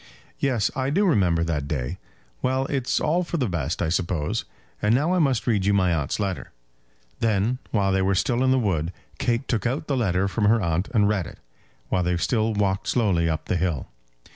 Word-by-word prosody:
"Yes; 125 -7 +1
I 130 0 0
do 200 +8 +2
remember 90 - +3
that 75 -4 -2
day. 65 -4 -3 0.4
Well; 130 +1 +1
it's 130 -3 0
all 170 +4 +1
for 170 - -3
the 130 -6 0
best, 85 -3 -2
I 80 - 0
suppose. 85 -3 -1 0.4
And 105 +3 +3
now 150 +7 +2
I 185 - +2
must 135 -7 +2
read 110 -6 +1
you 100 +1 +3
my 90 -3 +3
aunt's 75 +1 -1
letter." 95 -3 -3 0.7
Then, 115 +3 +1
while 100 -3 +1
they 95 0 +2
were 95 +1 +2
still 120 +6 +1
in 130 - +3
the 130 - +4
wood, 90 -8 0 0.3
Kate 125 0 0
took 115 -2 0
out 135 +5 -2
the 140 - -1
letter 100 -6 +1
from 105 +2 0
her 115 +2 +4
aunt 85 0 0
and 105 -4 +3
read 100 -5 0
it, - - -11 0.5
while 90 - +1
they 90 0 0
still 110 +6 0
walked 100 -1 0
slowly 95 -9 +2
up 80 -1 -2
the 90 - 0
hill. 85 -6 -1
100 Hz, 210 wpm, -24 LUFS, 90-125 Hz, 0.7 s, the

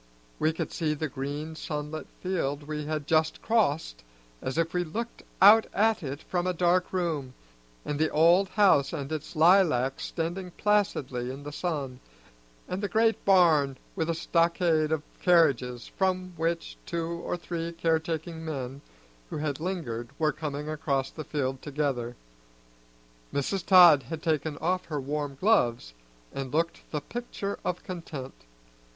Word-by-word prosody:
We 155 - +3
could 160 - -4
see 155 -3 -1
the 155 +1 -2
green 145 +4 -5
sunlit 150 0 -5
field 150 -6 -1
we 150 0 -5
had 155 -2 -2
just 160 +1 +2
crossed 160 - +1 0.4
as 130 - -3
if 165 0 0
we 180 0 +1
looked 225 +9 -5 0.2
out 215 +3 +8
at 220 +1 +3
it 140 0 -5
from 180 0 -1
a 185 - +1
dark 180 +1 +2
room, 160 -8 -2 0.5
and 145 0 -2
the 160 0 +2
old 170 +5 +4
house 190 -11 +4
and 140 +1 -4
its 155 -1 -5
lilacs 155 -6 +4
standing 175 +3 -3
placidly 145 -12 0
in 135 +2 -8
the 145 - -6
sun, 145 -6 -3 0.7
and 185 +2 -3
the 205 - -2
great 225 +3 +2
barn 160 -8 +4 0.2
with 160 0 -1
a 165 - +1
stockade 165 -2 +2
of 160 -2 0 0.2
carriages 135 -9 +3
from 185 -1 0
which 165 +1 -2
two 170 -1 -2 0.2
or - - -2
three 170 -1 -4
care 165 -1 +1
taking 160 0 -5
men 135 -3 -5 0.5
who - - -4
had 150 -2 -2
lingered 150 -10 -3
were 155 -1 +2
coming 150 -1 -4
across 140 -3 -1
the 155 - -7
field 135 -3 -2
together. 135 -5 -2 1.2
Mrs. 170 +7 -1
Todd 175 -7 +8
had 155 +5 -7
taken 155 -2 0
off 180 +4 -1
her 150 -3 -3
warm 145 0 -3
gloves 120 - +2 0.4
and 135 -2 -4
looked 165 +2 0
the 150 - -3
picture 205 0 -5
of 180 -1 -2
content. 160 -7 -7
160 Hz, 155 wpm, -28 LUFS, 145-175 Hz, 1.2 s, out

